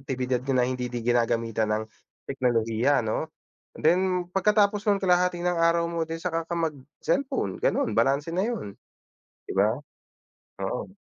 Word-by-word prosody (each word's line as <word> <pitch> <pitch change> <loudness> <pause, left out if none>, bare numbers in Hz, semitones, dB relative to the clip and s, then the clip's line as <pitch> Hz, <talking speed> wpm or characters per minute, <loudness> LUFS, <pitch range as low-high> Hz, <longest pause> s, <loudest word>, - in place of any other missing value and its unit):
aktibidad 130 -2 -2
ka 135 +1 -1
na 125 - +3
hindi 125 -1 -2
din 120 -1 -4
ginagamitan 115 -2 +1
ng 110 - 0 0.4
teknolohiya 120 0 +1
ano, 110 +8 -2 0.5
then 180 +2 +2
pagkatapos 205 +1 +3
ng 200 -1 +3
kalahati 180 -1 +3
ng 180 0 +1
araw 170 0 +3
mo 170 -1 -2
then 165 +1 -5
saka 165 -2 -1
ka 165 - -7
mag 165 -2 0 0.3
cellphone 275 -1 -1
ganun 280 - +1
balanse 140 +3 +2
na 185 - +1
yun 220 - -4 0.7
di - - -3
ba? 105 +3 +4 0.9
Oo. 125 - -3
160 Hz, 150 wpm, -26 LUFS, 120-180 Hz, 0.9 s, ba